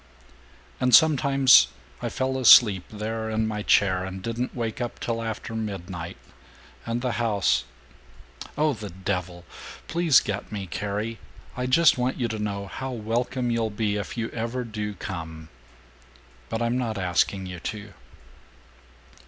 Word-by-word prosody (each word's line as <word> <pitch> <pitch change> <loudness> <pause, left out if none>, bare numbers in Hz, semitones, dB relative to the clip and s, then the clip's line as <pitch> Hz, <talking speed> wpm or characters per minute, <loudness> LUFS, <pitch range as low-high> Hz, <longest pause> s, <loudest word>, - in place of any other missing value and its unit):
And 125 -1 +5
sometimes 140 - +6 0.3
I - - -2
fell 130 0 -2
asleep 105 -7 +7
there, 110 +1 -4
in 110 0 0
my 105 -1 -3
chair, 95 -3 +3
and 95 0 -6
didn't 115 +5 -4
wake 115 -1 -3
up 120 - -4
till 115 -1 -2
after 115 0 -5
midnight, 95 -6 -5 0.7
and 120 +2 -2
the 125 - 0
house 100 - +1 0.9
Oh, 150 0 +2
the 105 -4 -7
devil! 90 -1 -4 0.4
Please 165 -4 +4
get 100 +1 -5
me, 100 -2 -4
Carrie. 105 +5 -4 0.4
I 125 0 -2
just 150 +1 +5
want 125 +2 -1
you 120 - +1
to 110 -1 -4
know 100 -1 -3
how 130 +7 -6
welcome 120 +1 -2
you'll 115 -1 0
be 105 0 -1
if 105 +3 -5
you 115 -1 -3
ever 120 +2 -3
do 105 -3 -5
come. 80 -4 -7 1.0
But 115 +1 -2
I'm 120 +2 0
not 115 -4 -2
asking 95 +1 0
you 90 -1 -7
to." 100 +2 -6
110 Hz, 145 wpm, -25 LUFS, 100-120 Hz, 1.0 s, asleep